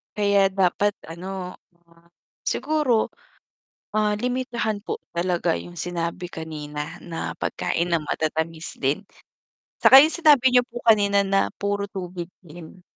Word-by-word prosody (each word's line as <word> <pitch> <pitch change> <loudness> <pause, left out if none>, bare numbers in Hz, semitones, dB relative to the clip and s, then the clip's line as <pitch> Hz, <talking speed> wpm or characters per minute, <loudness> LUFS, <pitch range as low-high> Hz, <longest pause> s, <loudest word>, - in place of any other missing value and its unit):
Kaya 200 -2 +3
dapat 195 +2 +1 0.2
ano, 180 +1 -7 0.9
siguro, 295 -8 +1 0.9
ah, 210 -1 +2
limitahan 240 -1 -2
po - - -4
talaga 175 -1 0
yung 175 - -9
sinabi 175 +1 -4
kanina 150 -2 -6
na 165 -2 -5
pagkain 170 +1 -1
ng 165 -3 0
matatamis 160 +1 -3
din. 140 +7 0 0.8
Tsaka 265 +1 +9
yung 310 - +4
sinabi 295 -6 +5
niyo 250 -1 +4
po 240 0 -8
kanina 200 -3 +4
na 195 0 +1
puro 200 0 -1
tubig 180 -3 -6
din. 175 +1 -13
190 Hz, 120 wpm, -24 LUFS, 170-215 Hz, 0.9 s, Tsaka